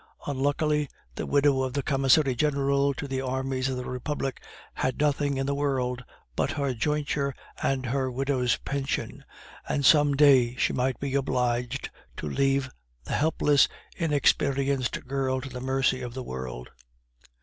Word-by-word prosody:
Unluckily, 145 +1 0 0.2
the - - -5
widow 140 -1 +3
of 130 -1 -2
the 140 0 -1
commissary 135 0 +3
general 140 +1 +1
to 145 - -5
the 130 -1 -2
armies 130 0 -1
of 130 - -2
the 125 - -4
Republic 135 +1 -3 0.3
had 130 - -1
nothing 145 -1 +1
in 135 - -1
the 140 - 0
world 130 -3 -1 0.3
but - - 0
her 140 -2 -1
jointure 140 +1 -1 0.3
and 135 -1 0
her 130 +1 0
widow's 130 -1 0
pension, 140 -1 -3 0.5
and 140 - 0
some 145 0 +6
day 135 -4 +5
she - - +1
might 130 0 0
be 140 -1 -3
obliged 125 -1 -1 0.3
to - - -4
leave 135 - +1 0.4
the - - -5
helpless, 150 -2 +3 0.3
inexperienced 140 -4 +1
girl 130 0 -1
to 135 +1 -7
the 125 -1 -7
mercy 130 0 +1
of 120 -1 -6
the 130 - -4
world. 65 - -6
135 Hz, 150 wpm, -27 LUFS, 130-140 Hz, 0.5 s, some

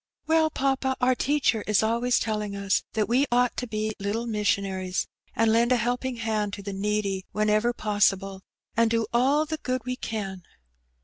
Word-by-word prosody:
"Well, 320 0 +3
papa, 270 -2 0
our 255 0 +3
teacher 260 -4 +1
is 210 0 +3
always 235 +2 +2
telling 210 -2 -2
ns 200 -1 +1
that 215 -2 0
we 260 +5 +2
ought 245 0 +2
to 250 - -3
be 215 0 -2
little 205 +4 -2
missionaries, 195 -4 -1 0.3
and 225 0 +3
lend 235 +2 +3
a - - +6
helping 245 +2 -1
hand 215 -3 -1
to 200 - -6
the 200 0 -5
needy 200 -1 -1
whenever 215 +2 +2
possible, 200 -3 0 0.3
and 230 0 +3
do 230 0 +1
all 275 +6 +3
the 315 0 -3
good 255 0 -2
we 250 0 -2
cim." 195 -6 -4
225 Hz, 175 wpm, -26 LUFS, 205-250 Hz, 0.3 s, a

